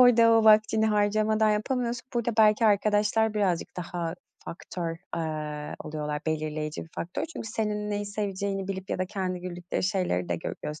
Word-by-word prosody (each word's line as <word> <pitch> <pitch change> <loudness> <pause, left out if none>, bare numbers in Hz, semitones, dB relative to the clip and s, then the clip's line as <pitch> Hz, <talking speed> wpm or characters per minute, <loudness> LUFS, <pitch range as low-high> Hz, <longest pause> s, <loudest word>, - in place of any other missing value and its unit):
orada 235 -2 +7
o 225 -1 +5
vaktini 220 0 +5
harcamadan 215 +1 +2
yapamıyorsun. 240 +3 -1
Burada 235 0 +1
belki 215 +1 +6
arkadaşlar 210 +1 +3
birazcık 185 -5 0
daha 170 -1 -3 0.3
faktör, 170 -1 -5 0.2
eee, 150 -2 -3
oluyorlar, 150 -1 -3
belirleyici 155 -1 -2
bir 165 - -19
faktör. 175 - -3
Çünkü 310 -9 -7
senin 210 -1 -2
neyi 205 0 -2
seveceğini 200 -1 -3
bilip 190 0 -5
ya - - -1
da 185 - 0
kendi 185 -2 -3
güldükleri 175 0 -4
şeyleri 180 - 0
de 85 - 0
gö 80 - -4
gös 150 0 -5
200 Hz, 160 wpm, -27 LUFS, 170-215 Hz, 0.3 s, orada